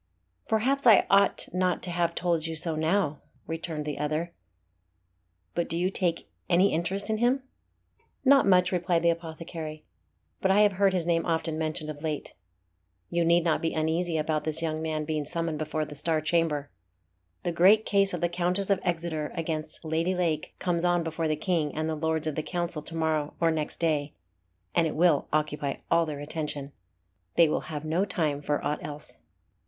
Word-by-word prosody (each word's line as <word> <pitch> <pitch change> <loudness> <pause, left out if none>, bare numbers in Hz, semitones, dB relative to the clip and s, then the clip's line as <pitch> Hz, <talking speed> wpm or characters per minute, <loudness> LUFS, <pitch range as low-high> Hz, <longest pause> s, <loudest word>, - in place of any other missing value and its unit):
"Perhaps 255 +5 +1
I 220 -4 +7
ought 200 0 +4
not 185 -1 0
to 180 - 0
have 170 -1 0
told 170 -2 0
you 165 - -4
so 165 0 +1
now," 160 -1 0 0.2
returned 160 -2 -4
the 150 -2 -4
other. 155 +3 -2 1.2
"But 170 - -1
do 165 - -1
you 180 +2 +1
take 175 -4 0 0.2
any 185 +3 +4
interest 190 +6 0
in 215 - 0
him?" 255 +3 +2 0.8
"Not 275 -4 +6
much," 180 -1 +4
replied 175 -2 +1
the 170 - +5
apothecary; 160 -1 -6 0.6
"but 190 - +2
I 195 +2 +5
have 210 -1 +5
heard 195 0 +2
his 175 -3 0
name 165 -1 +2
often 160 -1 0
mentioned 155 -1 -3
of 145 -1 -10
late. 155 -2 -4 0.8
You 170 0 +2
need 170 +1 +4
not 165 -2 +1
be 165 - -1
uneasy 160 +2 0
about 155 0 0
this 155 +1 0
young 160 -1 -2
man 155 -1 -2
being 155 -1 -1
summoned 165 0 -3
before 155 0 -2
the 150 - -9
Star 155 +2 +1
Chamber. 155 -2 0 0.7
The 175 - 0
great 195 +6 +5
case 200 -1 +3
of 175 - -4
the 175 - +3
Countess 180 +3 -1
of 195 - +3
Exeter 165 -3 -2
against 160 -1 -2
Lady 165 +4 0
Lake 165 -4 -1
comes 175 -2 -1
on 175 -1 +2
before 165 0 -2
the 155 - +1
King 155 -1 -1
and 155 0 -1
the 160 - -1
Lords 160 0 -1
of 155 - -1
the 155 - -2
Council 175 -1 -2
to 165 - -7
morrow 155 -2 0
or 165 -1 +3
next 155 -2 -3
day, 150 -3 0 0.6
and 165 -1 +3
it 155 - -4
will 165 -2 +3
occupy 150 -2 -1 0.2
all 170 -1 +4
their 150 -2 -5
attention. 145 -2 -4 0.6
They 170 - +6
will 155 - 0
have 155 -1 -5
no 165 +5 +1
time 155 -7 -1
for 145 0 -1
aught 150 +1 -2
else." 150 0 -6
165 Hz, 190 wpm, -28 LUFS, 155-175 Hz, 1.2 s, I